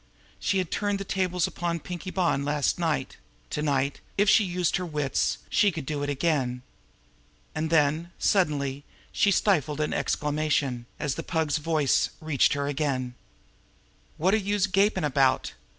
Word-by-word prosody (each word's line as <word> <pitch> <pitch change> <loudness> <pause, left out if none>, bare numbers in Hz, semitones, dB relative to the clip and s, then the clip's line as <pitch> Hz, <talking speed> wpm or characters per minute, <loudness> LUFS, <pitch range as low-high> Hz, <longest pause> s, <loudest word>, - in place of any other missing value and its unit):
She 195 - 0
had 185 -3 -1
turned 205 -1 0
the 195 - -4
tables 180 -2 0
upon 170 -1 -3
Pinkie 180 +2 -6
Bonn 175 -7 +1
last 145 +3 0
night; 160 -6 -1 0.3
to 150 - -2
night, 140 -2 0 0.2
if 205 +1 +3
she 210 - +6
used 180 -2 0
her 185 - -3
wits, 150 -5 -1
she 205 - +3
could 160 -5 -6
do 145 0 -3
it 145 - -2
again! 135 -4 0 0.9
And 160 +1 -2
then, 160 +2 +2
suddenly, 145 -8 +1 0.3
she 205 - +3
stifled 160 -7 +2
an 150 - 0
exclamation, 145 -5 -1
as 150 -3 -1
the - - -4
Pug's 160 -3 0
voice 150 -3 +2
reached 155 -4 +2
her 140 -1 -1
again: 135 -4 -1 1.0
"Wot 185 +5 +2
are - - +5
youse 205 -1 +1
gapin' 195 -1 +2
about? 135 -2 +2
155 Hz, 155 wpm, -27 LUFS, 145-180 Hz, 1.0 s, she